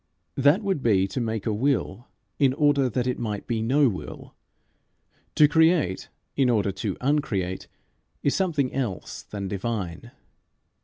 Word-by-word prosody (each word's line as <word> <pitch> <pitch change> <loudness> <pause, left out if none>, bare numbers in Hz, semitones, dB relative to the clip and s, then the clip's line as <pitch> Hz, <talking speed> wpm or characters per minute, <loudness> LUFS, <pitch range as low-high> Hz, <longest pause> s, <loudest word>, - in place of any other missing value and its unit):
That 145 - +3
would 195 -7 -1
be 100 -5 +3
to 125 - -3
make 110 -3 -3
a 110 - 0
will 120 -1 -1 0.3
in 135 -3 +3
order 145 -3 +3
that 125 +1 -1
it 125 - -1
might 105 -4 -4
be 115 -2 -2
no 135 +5 +3
will. 95 -6 -6 1.0
To 150 - +7
create 160 - +2 0.3
in 135 -3 +3
order 105 -4 +2
to 100 0 -4
uncreate 115 -10 -1 0.6
is 140 - +2
something 155 -9 0
else 115 -11 -4
than 100 -2 -6
divine. 100 0 -4
125 Hz, 145 wpm, -25 LUFS, 105-145 Hz, 1.0 s, To